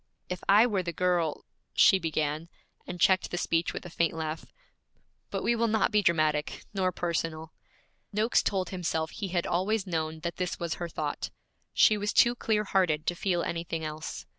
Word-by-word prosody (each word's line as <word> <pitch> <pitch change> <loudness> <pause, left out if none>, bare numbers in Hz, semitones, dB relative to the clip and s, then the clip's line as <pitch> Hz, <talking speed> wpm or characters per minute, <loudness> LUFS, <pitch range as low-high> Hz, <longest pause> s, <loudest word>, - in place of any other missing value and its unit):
'If 180 0 -4
I 210 +4 +7
were 205 -6 0
the 175 -1 -3
girl, 175 -2 0
' - - -48
she 190 - +6
began, 155 -1 -2 0.4
and 180 0 -6
checked 185 +2 +3
the 175 - -3
speech 165 -1 0
with - - -7
a 175 - -8
faint 165 -1 0
laugh. 160 0 -4 0.8
'But - - -3
we 235 - +2
will 230 0 +1
not 220 +1 +2
be 210 -1 +4
dramatic, 155 -4 +1
nor 185 -2 +1
personal.' 165 -2 -3 0.6
Noakes 215 +3 +2
told 190 -3 -1
himself 160 -4 -2
he 205 - -4
had 175 -1 -1
always 190 +4 0
known 160 -3 -3
that 170 +1 -4
this 180 -1 -2
was 170 -1 -2
her 170 - -3
thought; - - -3 0.4
she 215 - +5
was 205 0 -1
too 240 0 +5
clear 220 -3 0
hearted 180 -6 +1
to 175 - 0
feel 175 -1 0
anything 165 -1 -3
else. 155 0 -6
175 Hz, 190 wpm, -29 LUFS, 160-195 Hz, 0.8 s, I